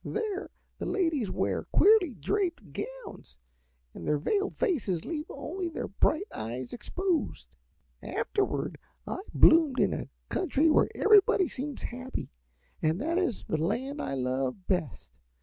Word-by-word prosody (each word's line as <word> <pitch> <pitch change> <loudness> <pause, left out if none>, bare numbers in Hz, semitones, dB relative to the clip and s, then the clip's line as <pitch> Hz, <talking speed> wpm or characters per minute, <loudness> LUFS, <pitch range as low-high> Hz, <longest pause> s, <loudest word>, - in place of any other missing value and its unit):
"There 430 -3 -3 0.3
the - - -3
ladies 325 - +1
wear - - -1
queerly 395 - +5
draped 340 - -2
gowns - - -8 0.6
and 85 - -8
their 150 - +3
veiled 400 - 0
faces 210 - 0
leave 310 -1 -4
only 345 +6 -4
their - - -5
bright 310 - +1
eyes 120 +3 -5
exposed. 355 +8 -2 0.6
"Afterward 405 -2 -1 0.3
I - - -4
bloomed 315 -5 +6
in - - +3
a - - -4 0.2
country 320 -3 +2
where - - +4
everybody 405 -3 +5
seems 280 0 -5
happy, 255 +2 -5 0.5
and 160 +3 +1
that 330 +7 0
is 280 - -1
the 155 - -1
land 265 - -1
I 135 - -2
love 130 +7 -2
best. 175 - -2
300 Hz, 135 wpm, -29 LUFS, -, 0.6 s, bloomed